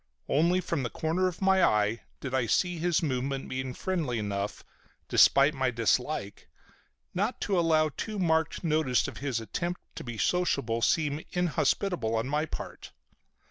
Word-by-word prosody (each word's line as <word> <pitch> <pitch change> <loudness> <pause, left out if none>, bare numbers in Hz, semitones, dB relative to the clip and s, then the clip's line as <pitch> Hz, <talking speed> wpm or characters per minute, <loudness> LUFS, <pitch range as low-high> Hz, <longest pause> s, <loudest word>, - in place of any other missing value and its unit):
Only 170 +6 +3
from 145 - -2
the 120 - -2
corner 165 +6 0
of 180 +1 -4
my 190 -1 +4
eye 105 +2 +2 0.2
did 135 -2 -5
I 130 -3 +1
see 175 - +1
his 175 0 +1
movement, 135 -1 -2
being 130 -1 -4
friendly 165 -10 -2
enough, 100 -1 -3 0.4
despite 140 +2 +5
my 130 -3 0
dislike, 115 -2 -1 0.6
not 205 +7 -1
to 195 -3 +1
allow 160 -2 +3
too 215 +8 -5
marked 160 -3 +1
notice 155 -6 +2
of - - -8
his 135 -4 -2
attempt 175 - -3 0.2
to - - -5
be 120 -3 -6
sociable 140 -8 0
seem 150 +4 +1
inhospitable 180 - 0
on 115 +2 -1
my 150 +3 0
part. - - -8
150 Hz, 155 wpm, -29 LUFS, 125-175 Hz, 0.6 s, despite